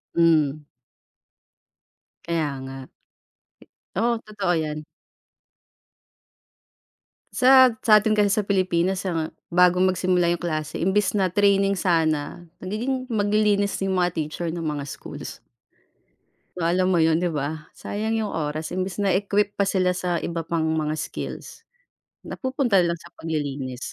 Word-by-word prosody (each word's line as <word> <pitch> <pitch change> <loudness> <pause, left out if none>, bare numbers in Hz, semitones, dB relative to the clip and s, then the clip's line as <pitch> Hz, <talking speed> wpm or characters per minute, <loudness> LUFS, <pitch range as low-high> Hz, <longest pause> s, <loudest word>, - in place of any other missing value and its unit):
Hmm. 155 -3 +3 1.6
Kaya 160 -4 -1
nga. 135 0 -8 1.1
Oo, 235 +5 +1
totoo 205 -4 -1
yan. 155 -1 -3 2.5
Sa, 260 -1 +6
sa'tin 215 -2 +4
kasi 205 -1 +4
sa 210 - +1
Pilipinas 185 -1 0
ang 165 -3 -2 0.2
bago 180 0 +5
mag-simula 185 -1 +2
yung 175 - -5
klase 155 -2 -3
imbis 190 +3 +1
na 190 -3 +1
training 200 0 +3
sana, 165 -2 0 0.2
nagiging 245 +7 -3
maglilinis 205 -2 +1
yung 190 - 0
mga 180 -1 +2
teacher 155 +2 -3
ng 165 0 -5
mga 150 -2 -2
schools. - - -9 1.1
So 180 - -6
alam 185 +3 +2
mo 170 - +3
yun, 160 0 +3
di 175 -1 -1
ba, 150 +2 -3
sayang 220 +2 -3
yung 215 - -2
oras 155 -1 -3
imbis 185 +2 -3
na 200 - +2
equip 200 +2 +1
pa 200 - +2
sila 185 -2 +1
sa 180 -1 -1
iba 165 -1 -4
pang 165 0 -1
mga 160 -1 0
skills, 155 - -7 0.6
napupunta 260 -7 0
lang 170 -1 0
sa 170 - -16
paglilinis. 140 -5 -4
180 Hz, 130 wpm, -24 LUFS, 160-200 Hz, 2.5 s, Sa